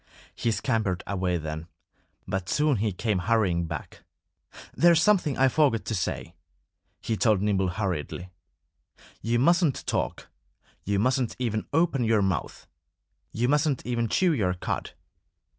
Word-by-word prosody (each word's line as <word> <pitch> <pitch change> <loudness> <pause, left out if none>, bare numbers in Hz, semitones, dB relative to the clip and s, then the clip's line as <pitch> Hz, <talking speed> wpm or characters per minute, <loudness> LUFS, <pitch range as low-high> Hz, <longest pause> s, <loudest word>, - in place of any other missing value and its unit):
He 115 - -1
scampered 105 -4 -1
away 90 -3 -1
then. 80 0 -5 0.6
But 95 -2 -3
soon 150 -3 +2
he 105 +1 0
came 105 +1 -1
hurrying 90 -4 +1
back. 80 -2 -7 0.7
"There's 170 -1 +5
something 175 -7 +2
I 135 - +5
forgot 130 -5 +2
to - - -3
say," 90 -3 -3 0.7
he 115 - -1
told 110 -3 +3
Nimble 95 -2 +1
hurriedly. 90 -2 -3 0.9
"You 115 +1 0
mustn't 170 +2 +2
talk. - - -2 0.6
You 100 0 0
mustn't 125 +3 +1
even 115 -4 -2
open 160 -4 +2
your 110 -3 +3
mouth. 95 -7 -2 0.7
You 120 +3 0
mustn't 145 -1 +1
even 120 -1 -1
chew 180 -3 +3
your 95 -9 0
cud." 90 - -4
110 Hz, 135 wpm, -26 LUFS, 95-130 Hz, 0.9 s, There's